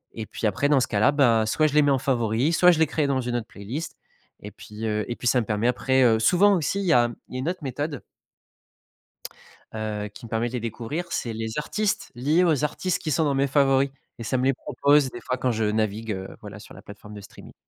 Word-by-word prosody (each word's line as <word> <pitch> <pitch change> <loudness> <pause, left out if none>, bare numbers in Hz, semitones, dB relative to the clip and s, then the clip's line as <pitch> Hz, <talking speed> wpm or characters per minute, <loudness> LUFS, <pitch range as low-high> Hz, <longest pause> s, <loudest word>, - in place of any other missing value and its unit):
et 110 -2 -6
puis, - - -5
après, 125 +8 +1
dans 140 -3 +4
ce - - +1
cas-là, 105 +4 +3
bah, 120 -6 +3
soit 155 +7 +2
je 150 - +1
les 150 - +5
mets 145 - +2
en 135 - +3
favoris, 125 +3 0
soit 180 0 +6
je 170 - +4
les 160 - +4
crée 150 0 -1
dans 135 -1 0
une 120 -1 -3
autre 115 -1 -3
playlist. 115 +12 -7 0.4
Et - - -9
puis 105 +1 -9
heu 105 -1 -1
et 120 - -2
puis, 125 - -4
ça 125 +1 +3
me 115 - -5
permet 105 +2 0
après 130 +1 +2
heu 115 -2 +4
souvent 195 - +4
aussi 185 +5 -1
il - - -3
y 175 - +3
a 120 -1 +4 0.2
il - - -13
y - - -2
a - - -3
une 145 +7 -2
autre 180 -3 -5
méthode 145 -2 -4 1.7
heu, 105 -1 -4
qui 120 +3 -12
me 110 - -15
permet 115 +1 0
de 125 - -11
les 125 - -2
découvrir, 115 +9 -4
c'est 115 - -3
les 110 +3 -5
artistes 210 +7 -2
liés 150 +9 +2
aux 155 -4 +2
artistes 180 +4 -1
qui 155 - -3
sont 155 +3 +1
dans 140 -2 +1
mes 135 +1 +2
favoris 135 -1 +3 0.3
et 115 - -7
ça 130 +4 -1
me 125 - 0
les 135 -1 +3
propose, 140 0 +2
des 120 - -9
fois, 125 - -3
quand 130 0 -1
je 110 -1 -1
navigue, 110 +1 -1
heu, 95 0 -6
voilà, - - -10
sur - - -13
la - - -12
plateforme 105 +1 -13
de 105 - -8
streaming. 100 - -14
125 Hz, 260 wpm, -24 LUFS, 110-145 Hz, 1.7 s, soit